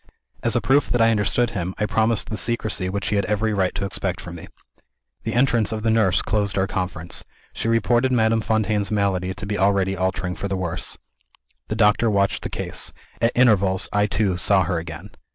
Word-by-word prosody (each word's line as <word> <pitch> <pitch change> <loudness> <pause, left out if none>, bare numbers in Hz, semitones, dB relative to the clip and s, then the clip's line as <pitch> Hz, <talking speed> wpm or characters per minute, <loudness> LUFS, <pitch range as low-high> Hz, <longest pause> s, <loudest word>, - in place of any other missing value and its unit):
As - - +1
a - - +2
proof 140 +2 +2
that 120 - +1
I 115 0 +5
understood 115 +3 +1
him, 90 -4 -4
I 105 - 0
promised 110 +1 0
the - - -1
secrecy 110 -5 -1
which 100 +1 -2
he 105 - +1
had 100 - +1
every 105 +1 0
right 95 -3 0
to 100 - -2
expect 95 -2 -3
from 90 -3 -8
me. 85 - -9 0.8
The - - -2
entrance 120 -3 +2
of 110 -1 -4
the 115 - +2
nurse 110 -5 +3
closed 100 -1 0
our 95 - +2
conference. 90 -3 -3 0.3
She - - -3
reported 120 +2 +2
Madame 110 -2 +2
Fontaine's 105 -2 0
malady 95 -3 0
to - - -6
be 105 +1 -3
already 95 -1 +2
altering 95 -1 -2
for 100 - -4
the 95 - -2
worse. 90 -2 -4 0.7
The 110 - -3
doctor 110 +1 +3
watched 100 -2 +1
the - - -5
case. - - -1 0.3
At 115 - +3
intervals, 100 -6 +3
I 105 0 +2
too 100 -3 0
saw 95 +1 +3
her 85 0 -1
again. 85 +4 -8
100 Hz, 205 wpm, -22 LUFS, 95-110 Hz, 0.8 s, I